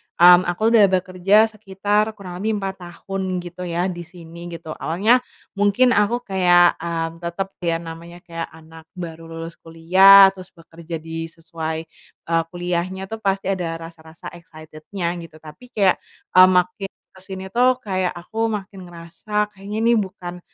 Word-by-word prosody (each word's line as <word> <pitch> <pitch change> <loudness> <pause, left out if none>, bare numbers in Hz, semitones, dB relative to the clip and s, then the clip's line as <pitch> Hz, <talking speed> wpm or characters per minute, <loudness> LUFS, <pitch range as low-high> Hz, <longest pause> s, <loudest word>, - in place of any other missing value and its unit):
mmm, 175 +1 +7
aku 215 +6 +1
udah 215 -3 +7
bekerja 195 +4 +3
sekitar 210 +1 -1
kurang 180 -2 -9
lebih 215 +1 -1
4 195 -1 -4
tahun 185 0 -4
gitu 180 +1 -7
ya 170 +1 -1
di 175 - -8
sini, 170 -1 -11
gitu. 165 -2 -8
Awalnya 200 +11 +2 0.4
mungkin 205 +5 +4
aku 230 +3 +1
kayak, 175 -2 +4
eee, 165 0 -4
tetap 175 +3 -4
ya 170 -2 0
namanya 170 +2 -10
kayak 165 -1 -6
anak 160 0 -15
baru 165 -2 -8
lulus 165 +1 -8
kuliah 190 +4 +7
terus 185 -1 -14
bekerja 165 0 -9
di 165 +1 -6
sesuai, 160 -1 -6 0.5
eee, 165 0 +3
kuliahnya 180 +3 -4
tuh 225 - -5
pasti 195 -2 -1
ada 175 -4 -2
rasa-rasa 165 -1 -11
excited-nya 165 +2 -6
gitu. 165 -2 -11
Tapi 155 +11 -14
kayak, 200 -6 +2 0.3
eee, 185 0 +8
makin 180 +2 +1 0.2
kesini 190 0 -9
tuh 250 +3 +3
kayak 185 -3 -1
aku 220 +6 -3
makin 200 -3 -6
ngerasa 190 +5 -4
kayaknya 205 +1 -7
ini 235 +1 +4
bukan, 180 -3 -6
180 Hz, 150 wpm, -21 LUFS, 165-195 Hz, 0.5 s, eee